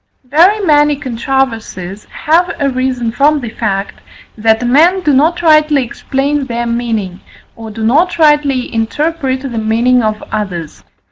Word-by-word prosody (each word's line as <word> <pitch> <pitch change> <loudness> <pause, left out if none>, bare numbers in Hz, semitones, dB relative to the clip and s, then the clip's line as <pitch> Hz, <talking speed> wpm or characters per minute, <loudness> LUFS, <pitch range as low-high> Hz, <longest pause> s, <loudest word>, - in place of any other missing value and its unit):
Very 335 +11 +3
many 295 -4 +3
controversies 230 -7 -3
have 340 +4 0
arisen 255 -3 -1
from 290 +5 +2
the 240 -5 -6
fact, 200 -4 -3 0.3
that 220 +2 +1
men 330 +10 +3
do 300 -5 +1
not 325 +6 +2
rightly 305 -3 +4
explain 275 +3 -2
their 240 -1 -3
meaning, 225 -6 -3 0.4
or 225 -1 -9
do 220 +1 -6
not 330 +10 +2
rightly 295 -5 +2
interpret 265 +4 -2
the 275 - -5
meaning 235 +3 +2
of 215 -1 -2
others. 185 -7 -5
260 Hz, 135 wpm, -13 LUFS, 225-295 Hz, 0.4 s, rightly